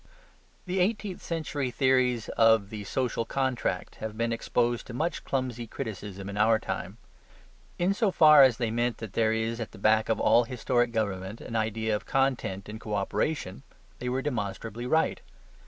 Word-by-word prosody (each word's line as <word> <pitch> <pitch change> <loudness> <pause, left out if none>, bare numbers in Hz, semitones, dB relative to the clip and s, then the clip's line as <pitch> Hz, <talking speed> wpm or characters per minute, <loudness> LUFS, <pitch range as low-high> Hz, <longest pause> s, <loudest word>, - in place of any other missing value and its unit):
The 185 +1 -1
eighteenth 200 0 -1
century 155 -5 -3
theories 125 -2 +2
of 110 -3 +3
the 105 -2 -6
social 125 +1 -1
contract 130 +1 -2
have 110 0 -6
been 115 0 0
exposed 120 +1 0
to 120 - -7
much 160 +6 -2
clumsy 125 -3 -2
criticism 100 -3 -6
in 100 0 -5
our 110 +1 +4
time; - - -5 0.8
in 180 +3 +2
so 210 +1 +1
far 155 -5 +7
as 130 -4 +6
they 115 -3 -1
meant 120 +1 0
that 110 -4 -8
there 110 -1 +2
is 110 +1 -1
at 115 - -5
the - - -11
back 110 +2 +3
of 115 - +1
all 120 - +4
historic 120 0 0
government 100 -2 -2
an 115 - -7
idea 110 0 0
of 105 - -6
content 130 -8 0
and 110 +1 -8
co 105 -1 -3
operation, 100 - -2 0.4
they 125 - -3
were 130 +1 -1
demonstrably 115 -2 -3
right. 160 +4 +1
115 Hz, 170 wpm, -28 LUFS, 110-130 Hz, 0.8 s, far